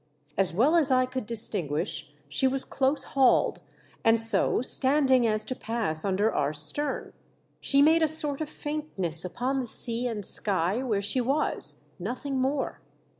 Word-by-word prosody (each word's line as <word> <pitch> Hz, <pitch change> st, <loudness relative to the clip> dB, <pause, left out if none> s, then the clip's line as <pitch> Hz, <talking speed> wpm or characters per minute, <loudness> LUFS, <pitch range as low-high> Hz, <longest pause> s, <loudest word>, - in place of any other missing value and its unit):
As 190 Hz, -2 st, +2 dB
well 250 Hz, -, +2 dB
as 315 Hz, -5 st, +3 dB
I 255 Hz, -1 st, +2 dB
could 255 Hz, -3 st, -6 dB
distinguish, 175 Hz, -8 st, -1 dB, 0.2 s
she 150 Hz, -, 0 dB
was 265 Hz, 0 st, +1 dB
close 270 Hz, +1 st, -1 dB
hauled, 265 Hz, -1 st, +1 dB, 0.4 s
and 225 Hz, 0 st, +4 dB
so 225 Hz, +1 st, +3 dB
standing 265 Hz, -2 st, +2 dB
as 215 Hz, -1 st, 0 dB
to 255 Hz, -, -5 dB
pass 220 Hz, -11 st, 0 dB
under 200 Hz, +3 st, 0 dB
our 145 Hz, +1 st, -1 dB
stern. 265 Hz, -, -4 dB, 0.5 s
She 280 Hz, 0 st, +2 dB
made 320 Hz, +2 st, +3 dB
a 320 Hz, -, +3 dB
sort 300 Hz, -2 st, +4 dB
ot 305 Hz, -, -4 dB
faintness 295 Hz, -, -3 dB
upon 250 Hz, +10 st, -3 dB
the 250 Hz, -, -5 dB
sea 235 Hz, +2 st, +4 dB
and 215 Hz, -4 st, -4 dB
sky 195 Hz, +3 st, -1 dB
where 215 Hz, -6 st, -2 dB
she 250 Hz, +6 st, 0 dB
was, 275 Hz, +5 st, 0 dB, 0.2 s
nothing 255 Hz, +7 st, -5 dB
more. 270 Hz, +2 st, -3 dB
245 Hz, 160 wpm, -26 LUFS, 200-275 Hz, 0.5 s, and